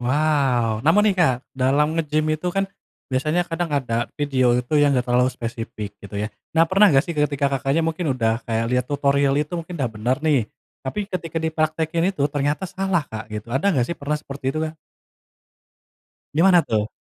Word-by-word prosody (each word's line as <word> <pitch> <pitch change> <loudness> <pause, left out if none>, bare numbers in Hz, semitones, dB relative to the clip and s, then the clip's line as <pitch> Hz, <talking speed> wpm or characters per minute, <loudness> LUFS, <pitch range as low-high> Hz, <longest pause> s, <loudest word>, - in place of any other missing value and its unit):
Wow. 130 -4 +1
Namun 205 - +4
nih, - - -7
Kak, 145 -8 +4 0.2
dalam 145 +5 +1
ngegim 155 -1 0
itu 155 +3 -2
kan 195 +2 0 0.5
biasanya 155 +7 +1
kadang 170 0 -3
ada 120 -5 -1
video 130 -4 +2
itu 125 +3 -3
yang 145 -2 +4
gak 125 - +1
terlalu 125 +1 +3
spesifik 115 -4 -6
gitu 100 0 -8
ya. 105 +2 -3 0.2
Nah, 165 - +7
pernah 195 +5 +5
gak 135 -3 +4
sih 170 - -4
ketika 150 -2 +1
Kakaknya 135 +6 +1
mungkin 165 -3 -1
udah 115 -1 +1
kayak 115 -1 0
liat 125 0 +2
tutorial 140 -1 +2
itu 150 +2 -1
mungkin 175 +1 -4
udah 130 -6 -1
bener 115 +4 0
nih, 145 -6 +3 0.4
tapi 135 +9 -5
ketika 170 -5 -5
dipraktekin 160 +1 0
itu 185 -8 -1
ternyata 145 +4 0
salah, 190 -3 -1
Kak, 110 0 -7
gitu, 105 +1 -6
ada 150 +9 +2
nggak 125 -9 +1
sih 170 - -3
pernah 150 0 -2
seperti 135 -2 -4
itu, 155 - -3
Kak? 155 0 -5 1.6
Gimana 175 0 +5
tuh? 105 -1 0
145 Hz, 185 wpm, -22 LUFS, 125-160 Hz, 1.6 s, Nah